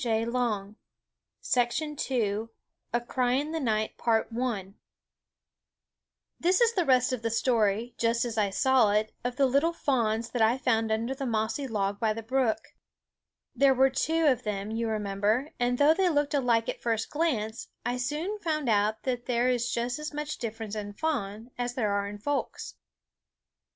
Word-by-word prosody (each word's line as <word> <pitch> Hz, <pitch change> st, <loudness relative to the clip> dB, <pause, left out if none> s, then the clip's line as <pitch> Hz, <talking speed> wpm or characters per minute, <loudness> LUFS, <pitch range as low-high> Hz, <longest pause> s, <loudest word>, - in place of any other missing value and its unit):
A 230 Hz, -2 st, 0 dB, 2.4 s
Cry 250 Hz, -1 st, +1 dB
in 290 Hz, +4 st, 0 dB
the 325 Hz, -, -2 dB
Night 220 Hz, -5 st, 0 dB, 2.5 s
This 360 Hz, +2 st, +3 dB
is 470 Hz, -1 st, +4 dB
the 360 Hz, -5 st, +1 dB
rest 255 Hz, -1 st, +3 dB
of 250 Hz, -, -3 dB
the 230 Hz, -, -1 dB
story, 225 Hz, -1 st, +1 dB
just 230 Hz, +1 st, +2 dB
as 235 Hz, -2 st, -4 dB
I 210 Hz, -2 st, +2 dB
saw 240 Hz, 0 st, +3 dB
it, 215 Hz, +1 st, 0 dB
of 245 Hz, 0 st, -2 dB
the 275 Hz, -, +3 dB
little 280 Hz, +6 st, +2 dB
fawns 230 Hz, -7 st, 0 dB
that 245 Hz, -, -1 dB
I 225 Hz, +3 st, +4 dB
found 225 Hz, -4 st, +1 dB
under 230 Hz, +4 st, 0 dB
the 270 Hz, 0 st, -4 dB
mossy 225 Hz, +4 st, -1 dB
log 205 Hz, -3 st, -1 dB
by 220 Hz, -1 st, +1 dB
the 225 Hz, +1 st, -6 dB
brook. 250 Hz, -1 st, 0 dB, 0.9 s
There 275 Hz, -1 st, +5 dB
were 265 Hz, +1 st, +4 dB
two 320 Hz, +4 st, +1 dB
of 255 Hz, -5 st, +3 dB
them, 210 Hz, -2 st, -3 dB
you 230 Hz, +1 st, -1 dB
remember; 215 Hz, +5 st, 0 dB
and 245 Hz, 0 st, +1 dB
though 290 Hz, +3 st, +6 dB
they 370 Hz, +1 st, +2 dB
looked 290 Hz, -2 st, +1 dB
alike 240 Hz, -5 st, +2 dB
at -, -, -4 dB
first 225 Hz, -2 st, -1 dB
glance, 240 Hz, -9 st, -1 dB, 0.2 s
I 245 Hz, +1 st, 0 dB
soon 305 Hz, +11 st, -2 dB
found 305 Hz, -8 st, -1 dB
out 215 Hz, 0 st, +1 dB
that 245 Hz, -2 st, -2 dB
there 245 Hz, 0 st, +2 dB
is 245 Hz, -1 st, 0 dB
just 245 Hz, +4 st, -1 dB
as 300 Hz, 0 st, -5 dB
much 300 Hz, 0 st, -4 dB
difference 225 Hz, -2 st, -5 dB
in 205 Hz, -1 st, -5 dB
fawns 225 Hz, -4 st, -3 dB
as 245 Hz, 0 st, -2 dB
there 200 Hz, -4 st, 0 dB
is 205 Hz, -, -6 dB
in -, -, -9 dB
folks. 285 Hz, +7 st, -3 dB
240 Hz, 160 wpm, -28 LUFS, 220-270 Hz, 2.5 s, though